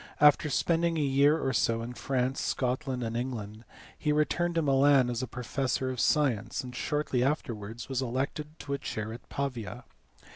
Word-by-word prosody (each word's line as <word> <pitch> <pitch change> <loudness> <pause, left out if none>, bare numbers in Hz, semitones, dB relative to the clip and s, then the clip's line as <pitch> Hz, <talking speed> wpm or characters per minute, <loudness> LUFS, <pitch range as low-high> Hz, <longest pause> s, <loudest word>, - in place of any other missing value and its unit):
After 150 +1 +6
spending 165 +2 +1
a - - +1
year 140 +3 +4
or 135 - 0
so 115 0 +1
in 120 +1 -6
France, 130 +1 -1
Scotland, 130 0 -1
and 115 0 -3
England, 115 -3 -4 0.4
be 150 - +2
returned 170 +3 +1
to 165 - +2
Milan 135 -2 +4
as 120 +1 -2
professor 130 +1 -2
of 125 - -5
science, 120 -8 +1
and 125 -1 -8
shortly 150 -3 0
afterwards 115 -5 -2
was 135 -1 -1
elected 140 +5 -3
to 140 - -4
a 140 - -1
chair 110 +1 -4
at 120 - -11
Pavia. 125 -3 -4
130 Hz, 170 wpm, -29 LUFS, 120-145 Hz, 0.4 s, After